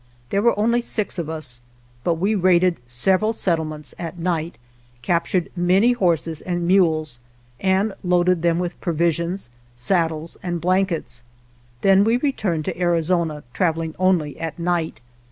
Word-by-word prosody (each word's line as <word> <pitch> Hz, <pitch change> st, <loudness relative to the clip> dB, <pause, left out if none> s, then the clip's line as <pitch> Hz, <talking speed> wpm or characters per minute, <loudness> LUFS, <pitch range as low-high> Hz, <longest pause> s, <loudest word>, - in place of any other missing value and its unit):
There 200 Hz, -, +2 dB
were 235 Hz, -1 st, +3 dB
only 235 Hz, +3 st, +2 dB
six 215 Hz, -5 st, -2 dB
of 160 Hz, -2 st, -3 dB
us, 145 Hz, -7 st, -5 dB, 0.4 s
but 170 Hz, -, +1 dB
we 195 Hz, +6 st, 0 dB
raided 185 Hz, -2 st, +3 dB
several 190 Hz, -, +2 dB
settlements 155 Hz, -7 st, -2 dB
(at 170 Hz, 0 st, -5 dB
night), 170 Hz, -1 st, -2 dB, 0.5 s
captured 170 Hz, +4 st, 0 dB
many 185 Hz, +7 st, +3 dB
horses 170 Hz, -8 st, 0 dB
and 175 Hz, -1 st, -2 dB
mules, 160 Hz, -8 st, +2 dB, 0.4 s
and 195 Hz, +2 st, +1 dB
loaded 180 Hz, -1 st, +2 dB
them 170 Hz, -1 st, +2 dB
with 175 Hz, 0 st, -4 dB
provisions, 170 Hz, -2 st, -1 dB, 0.2 s
saddles 160 Hz, +4 st, -1 dB
and 175 Hz, -1 st, -3 dB
blankets. 170 Hz, -8 st, 0 dB, 0.6 s
Then 195 Hz, 0 st, +5 dB
we 225 Hz, +3 st, +3 dB
returned 205 Hz, -, -1 dB
to 185 Hz, -2 st, -4 dB
Arizona, 170 Hz, -3 st, 0 dB
traveling 165 Hz, -2 st, 0 dB
only 180 Hz, -6 st, +1 dB
at 165 Hz, 0 st, -4 dB
night. 170 Hz, -4 st, -1 dB
175 Hz, 135 wpm, -22 LUFS, 160-190 Hz, 0.6 s, Then